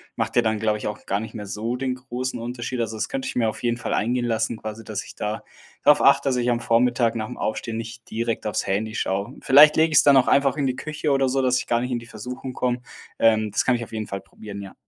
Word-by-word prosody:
Macht - - -2
ja 120 - +6
dann, 110 -1 0
glaube 105 -1 0
ich, - - -4
auch 105 - -6
gar 100 - 0
nicht 110 +1 -7
mehr 105 - -6
so 110 +4 -3
den 130 0 -2
großen 125 -1 -4
Unterschied. 120 +1 -4
Also 110 -1 -2
das - - -1
könnte 270 -1 -3
ich - - -5
mir 115 -2 +2
auf - - -7
jeden 120 -1 0
Fall 120 - -3
eingehen 120 +3 0
lassen, 115 -1 -1
quasi, 110 +1 -7
dass 105 -2 -4
ich - - -12
da 105 +1 -3 0.4
drauf - - +6
achte, - - +5
dass 125 - 0
ich 120 0 +1
am 120 - +1
Vormittag 120 0 +2
nach 110 -1 -3
dem - - -8
Aufstehen 110 +1 -3
nicht 115 0 -8
direkt 115 -1 -2
aufs 105 - -1
Handy 110 +3 -1
schaue. 100 +4 -2
Vielleicht 150 +3 +7
lege 160 0 +3
ich's 145 - +6
dann 140 -2 +6
auch 130 - +4
einfach 140 0 +3
in 145 - 0
die 130 -1 0
Küche 155 0 -3
oder 135 -1 +2
so, 135 +1 +1
dass 125 0 +3
ich - - -6
gar 120 -1 +2
nicht 125 +1 -3
in 120 - 0
die 115 - -12
Versuchung 125 +4 -7
komme. 125 0 -1 0.4
Ähm, 110 -2 +3
das - - +1
kann 125 - +3
ich 120 - -3
auf 115 - -11
jeden 110 -1 -4
Fall 100 0 -5
probieren, 100 -2 -10
ja. 95 - -9
120 Hz, 280 wpm, -23 LUFS, 110-125 Hz, 0.4 s, Vielleicht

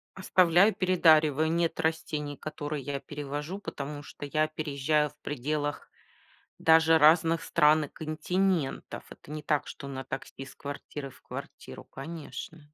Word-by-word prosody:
Оставляю 185 +2 +4
и - - -11
передариваю. 160 -4 +4
Нет 170 0 0
растений, 155 -3 -2
которые 150 -2 -5
я 140 0 -3
перевожу, 145 +5 -5
потому 145 -5 -6
что 145 - -9
я 155 +1 +1
переезжаю 150 -1 0
в 145 - -24
пределах 145 +1 -3 0.7
даже 160 0 +5
разных 165 +2 +5
стран 150 0 +4
и - - -10
континентов. 160 +1 -1
Это - - -14
не 155 -1 -5
так, 145 -1 0
что 140 - -8
на 135 -1 -5
такси 135 0 -7
из 135 - -12
квартиры 140 0 -7
в - - -19
квартиру, - - -9
конечно. 155 +1 -8
155 Hz, 140 wpm, -29 LUFS, 145-160 Hz, 0.7 s, даже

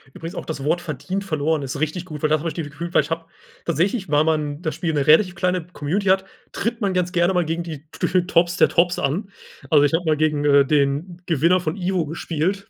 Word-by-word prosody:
Übrigens 165 +1 -7
auch - - -5
das 145 -4 -5
Wort 170 +4 +1
verdient 170 +5 -4
verloren 155 -3 0
ist 140 +2 -5
richtig 160 +3 -2
gut, 155 -4 -8
weil 155 - +1
da 155 - +4
habe 165 +3 -3
ich 155 - -4
dieses 155 -4 -5
Gefühl 170 +4 -6
weil - - +5
ich 150 - -9
habe 165 0 -2 0.4
tatsächlich, 185 +4 0
weil 150 +1 +4
man 150 -1 -1
das 155 - -2
Spiel 165 -3 -2
'ne 145 0 0
relativ 180 +4 +5
kleine 180 -1 -1
Community 180 +4 -3
hat, 190 0 +3 0.3
tritt 230 +1 -2
man 195 -3 0
ganz 180 0 0
gerne 175 +2 +2
mal 175 -1 +2
gegen 165 +2 -2
die 155 -3 -8
gefühlt 180 0 +1
Tops 175 +1 +3
der - - +5
Tops 175 +1 +2
an. 190 +9 -1 0.4
Also, 145 -2 +6
ich 145 - +2
habe 175 +2 +1
mal 155 -1 +2
gegen, 150 -1 +1
äh, 140 -1 +5
den 150 +5 0
Gewinner 170 +3 +3
von 160 +1 -3
Ivo 180 -4 -1
gespielt, 170 +5 -2
165 Hz, 240 wpm, -22 LUFS, 150-180 Hz, 0.4 s, Also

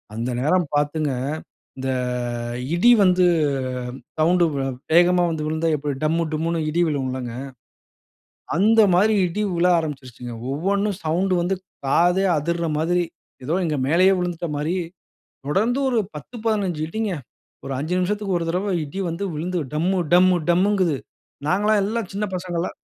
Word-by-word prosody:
அந்த 120 +2 -2
நேரம் 165 +3 +2
பாத்துங்க 145 0 0 0.7
இந்த 130 0 -3 0.9
இடி 235 +8 +5
வந்து 180 -1 +4 0.9
சவுண்ட்டு 175 +2 +4
வே 135 - -1 0.3
வேகமா 175 +1 +5
வந்து 155 -1 -3
விழுந்தா 160 +1 -1
எப்படி 145 0 -3
டம்மு 165 +2 +2
டும்முன்னு 165 +2 -1
இடி 170 +3 +1
விழுவும் 135 -4 -1
இல்லங்க? 125 -2 -5 1.2
அந்த 220 +4 +5
மாரி 210 +5 +4
இடி 205 +5 -2
விழ 170 +1 +2
ஆரம்பிச்சுருச்சுங்க. 130 -6 -6 0.2
ஒவ்வொண்ணும் 200 +5 0
சவுண்ட்டு 180 +3 +1
வந்து 190 +2 0 0.3
காதே 175 +7 +3
அதிர்ற 170 +3 -1
மாதிரி, 175 +3 +1 0.4
ஏதோ 155 +6 -1
எங்க 155 -3 -1
மேலயே 185 +5 +5
விழுந்துட்ட 175 -1 -2
மாரி 155 +5 -1 0.7
தொடர்ந்து 220 - +1
ஒரு 240 - +1 0.2
10 150 - -9
15 195 -7 0
இடிங்க. 220 +2 -2 0.5
ஒரு 135 - -3
5 155 +6 -2
நிமிஷத்துக்கு 195 0 0
ஒரு 170 - -3
தரவ, 185 +2 -1
இடி 150 +7 -6
வந்து 170 +5 -4
விழுந்து, 175 +4 -2 0.2
டம்மு 180 +5 +1 0.2
டம்மு 180 0 +6
டம்முங்குது. 185 -3 +2 0.5
நாங்கல்லாம் 210 +4 +3
எல்லாம் 220 -1 -2
சின்ன 210 +1 -1
பசங்களா 175 -1 -3
175 Hz, 140 wpm, -22 LUFS, 155-190 Hz, 1.2 s, டம்மு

